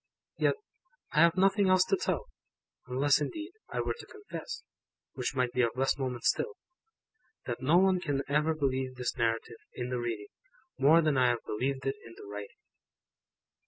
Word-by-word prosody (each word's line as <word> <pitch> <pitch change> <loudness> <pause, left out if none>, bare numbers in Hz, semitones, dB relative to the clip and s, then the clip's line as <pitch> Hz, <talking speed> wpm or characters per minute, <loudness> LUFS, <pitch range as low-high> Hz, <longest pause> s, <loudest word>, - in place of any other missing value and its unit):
Yet, - - +3 0.6
I 150 - +2
have 170 +2 +5
nothing 195 +1 +4
else 185 0 +6
to 390 - +2
tell; 385 +5 -1 0.6
unless, 140 +4 +3
indeed, 315 - -4 0.2
I - - -1
were - - -1
to - - -9
confess 430 +3 -7 0.5
(which - - -3
might 125 -2 +1
be 125 - +2
of 115 -1 +1
less 135 +1 +2
moment 125 -4 -3
still) 450 -2 +1 0.9
that 120 0 -4
no 150 +6 +4
one 190 0 +4
can 145 -5 -1
ever 150 +3 +2
believe 130 -3 -1
this 125 -1 -2
Narrative, 115 0 -1 0.2
in 125 0 -3
the 125 - -1
reading, 115 -4 -3 0.5
more 155 +5 +6
than 155 -3 +2
I 130 -1 +5
have 120 -1 0
believed 130 +4 -2
it 135 +1 -1
in 115 - -12
the - - -10
writing. 100 0 -8
135 Hz, 175 wpm, -30 LUFS, 125-170 Hz, 0.9 s, else